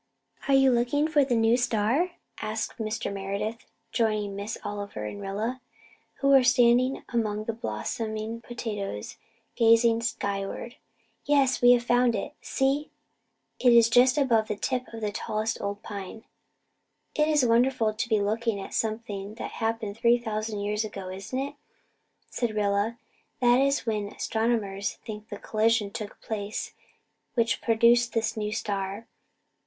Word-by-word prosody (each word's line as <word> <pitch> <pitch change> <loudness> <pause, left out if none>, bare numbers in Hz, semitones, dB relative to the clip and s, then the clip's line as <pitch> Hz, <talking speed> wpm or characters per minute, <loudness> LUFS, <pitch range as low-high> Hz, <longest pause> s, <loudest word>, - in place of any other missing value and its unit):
"Are 275 - +4
you 270 -1 +5
looking 245 +5 +2
for 305 -2 +3
the 260 -3 0
new 225 +1 +4
star?" 245 - +1 0.3
asked 215 +2 -3
Mr. 220 -1 -3
Meredith, 200 +4 -4 0.2
joining 215 -3 0
Miss 200 +2 -4
Oliver 200 - -5
and 205 - -6
Rilla, 215 +6 -3 0.5
who 275 - +1
were 270 -2 +7
standing 250 +1 +4
among 215 -3 -1
the 230 - -3
blossoming 220 - -4
potatoes 210 - -5 0.4
gazing 230 0 +5
skyward. 225 +1 -3 0.5
"Yes 275 -3 +3
we 245 0 +8
have 240 -1 +2
found 245 0 +3
it 205 - -4
see, 275 +2 0 0.7
it 250 - +5
is 230 -1 +6
just 250 +3 +5
above 235 -6 +3
the 210 - -2
tip 250 +4 -2
of 225 -1 -8
the 210 -1 -1
tallest 215 +2 -2
old 200 +1 -4
pine." 205 +2 -7 0.9
"It's 300 -2 +3
wonderful 235 -1 +3
to 215 +2 -3
be 215 -2 +3
looking 220 +1 0
at 195 - -8
something 215 -2 -3
that - - -6
happened 225 -2 -2
three 235 +1 +4
thousand 215 -2 -3
years 210 +1 -1
ago, 195 -3 -6
isn't 195 +7 -5
it?" 275 +2 -2 0.8
said 235 -3 -2
Rilla. 205 +2 +1 0.4
"That 245 0 +5
is 275 +1 +1
when 210 -3 -1
astronomers 220 -2 -1
think 215 -1 -7
the 205 - -6
collision 215 -1 +1
took 210 0 -7
place 210 -1 -4 0.6
which 230 -3 +1
produced 235 +1 +4
this 225 -1 0
new 210 -1 -2
star. 200 -1 -3
225 Hz, 145 wpm, -27 LUFS, 210-245 Hz, 0.9 s, we